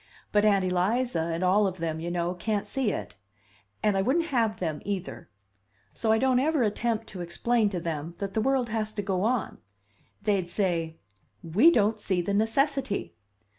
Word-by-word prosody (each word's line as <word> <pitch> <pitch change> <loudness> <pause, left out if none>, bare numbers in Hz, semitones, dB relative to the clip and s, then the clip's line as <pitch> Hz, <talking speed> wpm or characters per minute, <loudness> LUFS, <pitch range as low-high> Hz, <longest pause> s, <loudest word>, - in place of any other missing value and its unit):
But 210 0 +3
Aunt 200 -3 +4
Eliza, 185 0 0
and 165 +2 -2
all 200 +3 +4
of 185 -1 -4
them, 160 -2 -3
you 170 +2 -4
know, 175 0 -1
can't 205 +3 -2
see 265 -6 0
it. 105 - -6 0.7
And 210 -2 +3
I 195 - +2
wouldn't 325 - +1
have 225 -3 +1
them, 160 -4 -3
either! 175 - -5 0.6
So 220 - 0
I 220 - +4
don't 255 +1 +3
ever 295 -1 +2
attempt 225 +1 -1
to 185 - -7
explain 215 +6 +1
to 185 -3 -3
them 165 -1 -4
that 195 -1 -4
the 220 - +1
world 260 0 +1
has 215 -1 -2
to 205 - -3
go 190 -2 -1
on. 230 +1 -1 0.6
They'd 195 -4 +1
say, 170 -4 -1 0.5
'We 195 - +5
don't 215 -2 +2
see 190 -3 0
the 175 +3 -1
necessity! 245 +2 0
205 Hz, 180 wpm, -27 LUFS, 175-225 Hz, 0.7 s, We